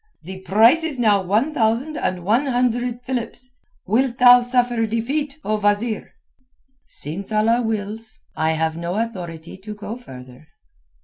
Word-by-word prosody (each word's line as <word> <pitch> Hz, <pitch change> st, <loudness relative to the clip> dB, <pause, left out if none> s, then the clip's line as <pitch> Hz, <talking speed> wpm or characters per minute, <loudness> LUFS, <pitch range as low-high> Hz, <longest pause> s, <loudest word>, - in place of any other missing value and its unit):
"The 185 Hz, +3 st, -8 dB
price 225 Hz, -, +4 dB
is 310 Hz, -4 st, -3 dB
now 210 Hz, -5 st, +3 dB
one 215 Hz, -, 0 dB
thousand 240 Hz, +5 st, 0 dB
and 180 Hz, -9 st, -2 dB
one 235 Hz, +8 st, +2 dB
hundred 245 Hz, -1 st, 0 dB
philips. 250 Hz, 0 st, -5 dB, 0.3 s
Wilt 245 Hz, +4 st, +1 dB
thou 245 Hz, 0 st, +8 dB
suffer 245 Hz, -2 st, +1 dB
defeat, 275 Hz, +6 st, -2 dB
O 215 Hz, 0 st, -1 dB
wazeer?" 205 Hz, +2 st, -1 dB, 0.7 s
"Since 175 Hz, +9 st, -6 dB
Allah 225 Hz, +3 st, +2 dB
wills. 220 Hz, 0 st, -5 dB
I 160 Hz, +1 st, +1 dB
have 160 Hz, 0 st, -1 dB
no 170 Hz, +2 st, -4 dB
authority 175 Hz, -8 st, -5 dB
to 210 Hz, +2 st, -9 dB
go 210 Hz, +2 st, -6 dB
further." 130 Hz, -, -13 dB
225 Hz, 140 wpm, -21 LUFS, 190-245 Hz, 0.7 s, thou